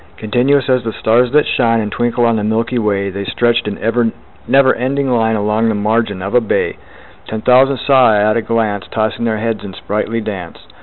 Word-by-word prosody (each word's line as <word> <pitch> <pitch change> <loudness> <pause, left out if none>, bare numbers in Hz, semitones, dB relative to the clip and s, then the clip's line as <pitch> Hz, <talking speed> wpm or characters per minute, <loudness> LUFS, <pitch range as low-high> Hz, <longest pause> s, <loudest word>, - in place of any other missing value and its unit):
Continuous 125 +5 +1
as 130 -2 +1
the 115 -1 -4
stars 120 +2 +1
that 150 0 +3
shine 115 -1 +1
And 105 -2 -3
twinkle 120 0 0
on 115 -1 +2
the 105 - -2
milky 115 +3 -1
way, 100 -3 -1
The 100 +1 -5
stretched 120 +2 0
in 105 - -4 0.7
never 135 0 +4
ending 135 +2 -1
line 110 -2 +1
Along 105 +2 0
the 110 - 0
margin 105 -2 -1
of 100 - -5
a 125 - +4
bay: 110 - -1 0.5
Ten 110 0 -5
thousand 130 +3 +4
saw 130 -3 +4
I 105 - +3
at 105 +1 +2
a 115 - +1
glance, 110 -4 -1
Tossing 110 +3 -2
their 110 -1 -1
heads 115 0 -3
in 95 -2 -8
sprightly 105 +2 -3
dance. 95 -6 -6
115 Hz, 205 wpm, -15 LUFS, 105-120 Hz, 0.7 s, never